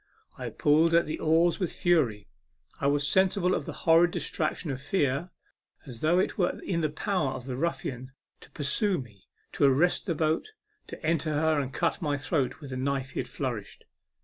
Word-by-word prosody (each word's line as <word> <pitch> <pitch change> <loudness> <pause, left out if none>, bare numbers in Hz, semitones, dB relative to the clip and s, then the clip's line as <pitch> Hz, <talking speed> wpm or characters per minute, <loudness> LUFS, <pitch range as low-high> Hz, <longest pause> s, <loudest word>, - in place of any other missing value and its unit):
I - - -5
pulled 160 +3 +3
at 170 - +4
the 155 - -4
oars 165 +2 +3
with 180 -4 -1
fury; 135 - +1 0.5
I 140 - +1
was 145 0 +2
sensible 190 +1 +3
of - - -2
a - - -9
horrid 165 +1 +6
distraction 160 -1 -2
of 135 0 -5
fear, 145 0 0 0.6
as 125 -5 -9
though 160 +5 +2
it 185 - 0
were 180 - +1
in 170 -3 -1
the 155 - +1
power 155 -3 -1
of 125 -2 -7
the 130 -2 -4
ruffian 130 -4 -3 0.3
to - - -16
pursue 175 +7 0
me, 105 - -11 0.2
to 145 - +2
arrest 150 +10 +3
the 170 - 0
boat, 160 - -1 0.3
to - - -8
enter 155 -1 +1
her 155 0 +2
and 135 -2 -3
cut 165 +4 -1
my 145 -3 0
throat 145 0 -1
with 140 -3 -8
the 130 - -4
knife 135 0 -2
he - - -4
had - - -3
flourished. - - -5
155 Hz, 195 wpm, -28 LUFS, 135-170 Hz, 0.6 s, horrid